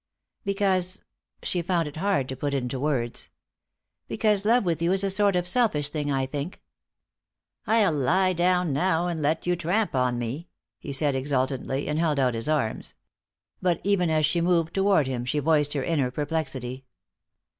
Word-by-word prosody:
"Because 195 Hz, -2 st, 0 dB, 0.2 s
" -, -, -32 dB
she 175 Hz, -, -1 dB
found 170 Hz, -2 st, 0 dB
it 150 Hz, -, -9 dB
hard 185 Hz, -7 st, 0 dB
to 130 Hz, -, -4 dB
put 140 Hz, +2 st, -2 dB
into 130 Hz, -1 st, -2 dB
words 130 Hz, -5 st, -2 dB, 0.8 s
"because 210 Hz, -2 st, +1 dB
love 235 Hz, 0 st, +3 dB
with 170 Hz, -2 st, -1 dB
you 170 Hz, +1 st, +2 dB
is 195 Hz, +1 st, +3 dB
a 195 Hz, -, +1 dB
sort 200 Hz, 0 st, +3 dB
of 180 Hz, 0 st, 0 dB
selfish 180 Hz, -, +2 dB
thing, 145 Hz, -2 st, -2 dB
I 135 Hz, -1 st, 0 dB
think." 145 Hz, +6 st, -5 dB, 1.1 s
"I'll 215 Hz, -6 st, +3 dB
lie 185 Hz, +7 st, +2 dB
down 180 Hz, -2 st, +1 dB
now 165 Hz, +3 st, +1 dB
and 170 Hz, -3 st, -2 dB
let 155 Hz, +2 st, 0 dB
you 175 Hz, 0 st, +1 dB
tramp 180 Hz, +6 st, 0 dB
on 125 Hz, -2 st, +1 dB
me," 125 Hz, +8 st, -4 dB, 0.3 s
he 145 Hz, -, -7 dB
said 140 Hz, 0 st, +1 dB
exultantly, 135 Hz, 0 st, -1 dB
and 150 Hz, +1 st, -1 dB
held 160 Hz, -3 st, +1 dB
out 130 Hz, -3 st, +2 dB
his 115 Hz, +5 st, -3 dB
arms. 140 Hz, -8 st, -1 dB, 0.7 s
But 180 Hz, -2 st, +1 dB
even 190 Hz, -4 st, +2 dB
as 155 Hz, -1 st, +3 dB
she 170 Hz, +3 st, +1 dB
moved 170 Hz, -2 st, +1 dB
toward 195 Hz, -6 st, +3 dB
him 130 Hz, -2 st, -3 dB
she 130 Hz, +5 st, -2 dB
voiced 150 Hz, -1 st, +2 dB
her 140 Hz, -3 st, -1 dB
inner 145 Hz, -6 st, 0 dB
perplexity. 135 Hz, -3 st, -3 dB
155 Hz, 175 wpm, -26 LUFS, 135-180 Hz, 1.1 s, love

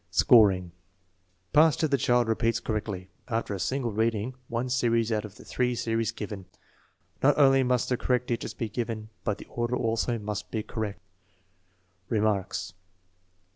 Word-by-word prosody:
Scoring. 95 Hz, -7 st, +5 dB, 0.8 s
Passed 155 Hz, +1 st, +5 dB
if 155 Hz, -, +1 dB
the -, -, +5 dB
child 120 Hz, 0 st, +3 dB
repeats 115 Hz, +1 st, +1 dB
correctly, 105 Hz, -5 st, -4 dB, 0.2 s
after 115 Hz, -3 st, -2 dB
a 100 Hz, -, -4 dB
single 130 Hz, +2 st, -1 dB
reading, 110 Hz, +2 st, 0 dB
one 120 Hz, +2 st, -2 dB
series 115 Hz, -3 st, +1 dB
out 110 Hz, -1 st, 0 dB
of 100 Hz, -, -11 dB
the -, -, -14 dB
three 125 Hz, -1 st, 0 dB
series 115 Hz, -1 st, -1 dB
given. 100 Hz, -3 st, -6 dB, 0.8 s
Not -, -, +4 dB
only 135 Hz, -2 st, +6 dB
must 125 Hz, -1 st, +1 dB
the 125 Hz, -, +1 dB
correct 125 Hz, 0 st, 0 dB
digits 120 Hz, -1 st, -3 dB
be 115 Hz, -, -3 dB
given, 110 Hz, -1 st, -4 dB
but 105 Hz, -3 st, -1 dB
the -, -, -10 dB
order 120 Hz, +1 st, -2 dB
also 115 Hz, +1 st, 0 dB
must 105 Hz, -1 st, -5 dB
be 110 Hz, -2 st, -2 dB
correct. 105 Hz, -3 st, -4 dB, 1.1 s
Remarks. 105 Hz, -6 st, 0 dB
115 Hz, 155 wpm, -27 LUFS, 105-125 Hz, 1.1 s, only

